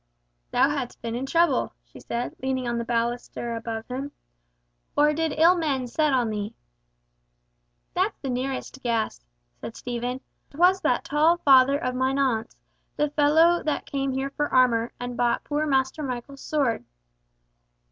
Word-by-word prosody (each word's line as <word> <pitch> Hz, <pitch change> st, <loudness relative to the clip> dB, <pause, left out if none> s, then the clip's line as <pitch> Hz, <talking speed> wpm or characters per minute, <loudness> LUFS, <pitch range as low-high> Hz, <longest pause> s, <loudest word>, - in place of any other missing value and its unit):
"Thou -, -, +4 dB
hast 270 Hz, -4 st, -4 dB
been 230 Hz, -1 st, -3 dB
in 255 Hz, +3 st, -3 dB
trouble," 340 Hz, +4 st, +2 dB
she -, -, -14 dB
said, 235 Hz, +1 st, -4 dB
leaning 260 Hz, -1 st, -1 dB
on 240 Hz, 0 st, -1 dB
the -, -, -2 dB
baluster 235 Hz, 0 st, -2 dB
above 225 Hz, -1 st, -5 dB
him. 270 Hz, +3 st, -5 dB, 0.9 s
"Or 300 Hz, +1 st, +5 dB
did 320 Hz, 0 st, 0 dB
ill 335 Hz, +3 st, +6 dB
men 285 Hz, -7 st, -1 dB
set 300 Hz, +5 st, +1 dB
on 245 Hz, -4 st, +1 dB
thee?" 210 Hz, +1 st, -4 dB, 1.4 s
"That's 380 Hz, +4 st, 0 dB
the 270 Hz, -, -4 dB
nearest 265 Hz, +1 st, -4 dB
guess," 230 Hz, -, -1 dB, 0.4 s
said 225 Hz, -, -7 dB
Stephen. 245 Hz, +1 st, -4 dB, 0.3 s
"'Twas 360 Hz, +6 st, +3 dB
that -, -, +1 dB
tall 315 Hz, +4 st, +3 dB
father 275 Hz, -3 st, +5 dB
of 255 Hz, -3 st, -2 dB
mine 260 Hz, +2 st, 0 dB
aunt's, 240 Hz, -5 st, 0 dB, 0.4 s
the 295 Hz, -1 st, +1 dB
fellow 315 Hz, +4 st, +4 dB
that 305 Hz, -, -2 dB
came 275 Hz, -1 st, -2 dB
here 265 Hz, +1 st, -2 dB
for 295 Hz, +1 st, -2 dB
armour, 240 Hz, -2 st, +3 dB
and 245 Hz, 0 st, -5 dB
bought 240 Hz, 0 st, +1 dB
poor 300 Hz, +1 st, -1 dB
Master 265 Hz, +1 st, +1 dB
Michael's 270 Hz, 0 st, -5 dB
sword." 275 Hz, -, 0 dB
265 Hz, 155 wpm, -25 LUFS, 240-295 Hz, 1.4 s, ill